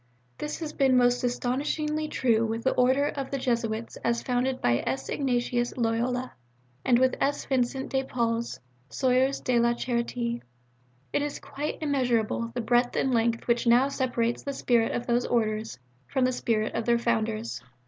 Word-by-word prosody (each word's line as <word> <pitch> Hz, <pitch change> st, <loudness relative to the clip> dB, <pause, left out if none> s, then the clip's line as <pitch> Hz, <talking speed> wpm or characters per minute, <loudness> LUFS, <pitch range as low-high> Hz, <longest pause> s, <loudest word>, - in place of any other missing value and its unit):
This 300 Hz, -, -3 dB
has 310 Hz, -2 st, -4 dB
been 265 Hz, -3 st, +3 dB
most 245 Hz, 0 st, +3 dB
astonishingly 295 Hz, +5 st, -1 dB
true 230 Hz, -6 st, +2 dB
with 225 Hz, 0 st, -2 dB
the 260 Hz, -, +3 dB
Order 260 Hz, +3 st, +3 dB
of 275 Hz, -2 st, -4 dB
the 275 Hz, -, -2 dB
Jesuits 230 Hz, -3 st, -2 dB
as 235 Hz, 0 st, 0 dB
founded 255 Hz, +1 st, 0 dB
by 120 Hz, 0 st, +2 dB
S. 135 Hz, 0 st, -2 dB
Ignatius 245 Hz, -3 st, 0 dB
Loyola, 245 Hz, +2 st, 0 dB, 0.5 s
and 240 Hz, -, +4 dB
with 260 Hz, +1 st, +3 dB
S. 285 Hz, +1 st, 0 dB
Vincent 265 Hz, 0 st, -1 dB
de 265 Hz, -, +2 dB
Paul's 235 Hz, -2 st, -2 dB, 0.3 s
S[oe]urs 260 Hz, +1 st, +1 dB
de 245 Hz, -2 st, +2 dB
la 235 Hz, 0 st, +3 dB
Charité. 235 Hz, -1 st, -2 dB, 0.7 s
It -, -, +2 dB
is 290 Hz, 0 st, -3 dB
quite 295 Hz, +2 st, -5 dB
immeasurable 240 Hz, -5 st, 0 dB
the 245 Hz, -, -1 dB
breadth 240 Hz, +2 st, +2 dB
and 265 Hz, -, +1 dB
length 230 Hz, 0 st, +1 dB
which 235 Hz, 0 st, +1 dB
now 245 Hz, +4 st, +5 dB
separates 245 Hz, -4 st, -1 dB
the 280 Hz, -, -4 dB
spirit 235 Hz, -4 st, +2 dB
of 240 Hz, -, -2 dB
those 240 Hz, 0 st, +1 dB
Orders 220 Hz, -, -1 dB, 0.3 s
from 265 Hz, -2 st, +1 dB
the 255 Hz, -, +2 dB
spirit 220 Hz, -3 st, -1 dB
of 230 Hz, 0 st, -2 dB
their 235 Hz, -1 st, +3 dB
Founders. 225 Hz, -, -1 dB
245 Hz, 170 wpm, -27 LUFS, 230-260 Hz, 0.7 s, now